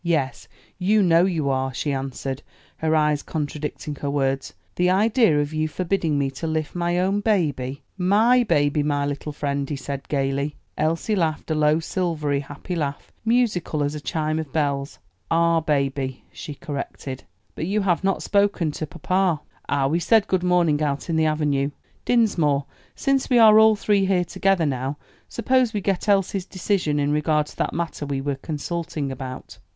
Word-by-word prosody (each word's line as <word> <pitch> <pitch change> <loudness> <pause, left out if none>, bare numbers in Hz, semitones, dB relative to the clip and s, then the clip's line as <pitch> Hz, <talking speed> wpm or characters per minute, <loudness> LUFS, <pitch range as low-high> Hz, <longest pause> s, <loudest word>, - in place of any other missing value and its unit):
"Yes, 155 -6 -1 0.3
you 205 +3 +3
know 170 0 +5
you 165 -6 -1
are," 130 0 0
she 145 - -1
answered, 135 0 -4 0.4
her 160 0 +1
eyes 150 -1 +2
contradicting 150 -1 -4
her 140 - -3
words; 135 -1 -1 0.2
"the 180 0 +2
idea 210 - +3
of 145 +1 -2
you 155 0 0
forbidding 165 -2 -1
me 140 -1 0
to 135 +5 -5
lift 155 -1 -2
my 175 0 0
own 190 +3 +1
baby!" 145 - 0 0.2
"My 220 +7 +4
baby, 150 -7 +2
my 145 -1 0
little 145 +1 -4
friend," 140 -1 -2
he 150 - -2
said 140 0 -6
gayly. 140 +1 -1 0.2
Elsie 165 +7 0
laughed 160 -3 -1
a - - +3
low, 155 0 +3
silvery, 160 -5 -1
happy 145 +6 -6
laugh, 145 -4 -3
musical 220 -10 +1
as 145 +1 -1
a 150 - -6
chime 155 +1 -1
of 155 -4 -5
bells. 140 -2 -1 0.3
"Our 165 0 +3
baby," 140 -4 -1
she 150 -4 -7
corrected. 140 -4 -6 0.3
"But 160 - -4
you 210 +2 +1
have 185 -2 +1
not 195 0 0
spoken 200 -6 +2
to 155 +1 -5
papa." 185 0 0 0.3
"Ah, 140 -1 +2
we 155 +5 +1
said 215 +4 +4
good 185 -3 0
morning 175 -4 +2
out 145 +2 -1
in - - 0
the 160 0 +3
avenue. 145 -3 +1 0.4
Dinsmore, 165 - +2 0.3
since 275 -1 0
we 250 - +4
are 220 -2 +8
all 220 0 +6
three 200 -1 +2
here 180 -2 +2
together 185 0 +1
now, 135 0 -2 0.3
suppose 250 0 +1
we 210 - 0
get 195 +1 -1
Elsie's 195 -1 +2
decision 180 -6 0
in 145 0 +1
regard 150 0 +2
to - - -14
that - - 0
matter 165 -3 -3
we 140 -1 -2
were 140 +1 -1
consulting 155 -1 -4
about." 130 -1 -8
155 Hz, 175 wpm, -23 LUFS, 145-185 Hz, 0.4 s, are